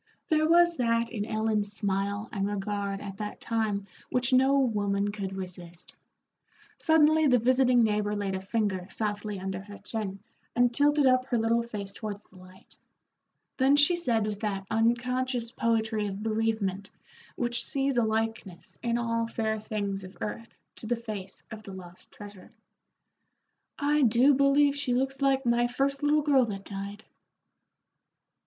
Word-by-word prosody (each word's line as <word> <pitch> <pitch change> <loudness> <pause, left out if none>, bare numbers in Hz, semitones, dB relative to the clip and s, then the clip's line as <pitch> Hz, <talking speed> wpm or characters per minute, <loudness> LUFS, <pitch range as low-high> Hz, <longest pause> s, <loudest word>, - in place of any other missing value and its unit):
There 310 0 +3
was 345 0 +5
that 230 -1 +1
in 210 -4 -3
Ellen's 215 -1 0
smile 200 0 -2
and 195 -2 -1
regard 200 -1 -3
at 195 -1 -7
that 210 0 -6
time 220 -3 -1 0.2
which 250 0 0
no 265 +2 +5
woman 205 -5 +1
could 195 -2 -5
resist. 180 -2 -8 0.8
Suddenly 315 -1 +4
the 250 -2 +5
visiting 250 0 +4
neighbor 210 -1 0
laid 200 -2 -2
a 190 - -3
finger 195 -3 -1
softly 210 -1 -3
under 190 0 -4
her 205 +1 -11
chin 210 -4 -5 0.4
and 245 0 +3
tilted 290 +2 +3
up 255 0 +3
her 245 - 0
little 230 +1 +2
face 210 -4 -6
towards 210 -1 -6
the 190 - -20
light. 185 +1 -17 0.8
Then 270 +1 +4
she 290 +5 +5
said 235 -11 0
with 210 -1 -4
that 200 -3 -3
unconscious 240 +1 0
poetry 220 -3 0
of 200 +1 -5
bereavement 215 -3 -1 0.5
which 240 -1 0
sees 275 -1 0
a 240 - +3
likeness 220 -4 -3
in 235 -1 0
all 230 -1 -1
fair 220 -1 -2
things 200 -2 -3
of 185 +1 -11
earth 230 +2 -6 0.2
to 220 - -6
the 240 - +1
face 215 -5 -7
of 220 -1 -7
the 195 -2 -10
lost 180 -1 -12
treasure, 205 -2 -12 1.3
"I 295 +1 +2
do 250 +3 +5
believe 280 +1 +4
she 285 -4 0
looks 270 +2 -1
like 270 -1 +2
my 240 0 +3
first 275 +3 -1
little 295 +1 +3
girl 275 -4 +4
that 195 -3 -6
died." 200 +1 -7
225 Hz, 155 wpm, -28 LUFS, 200-255 Hz, 1.3 s, was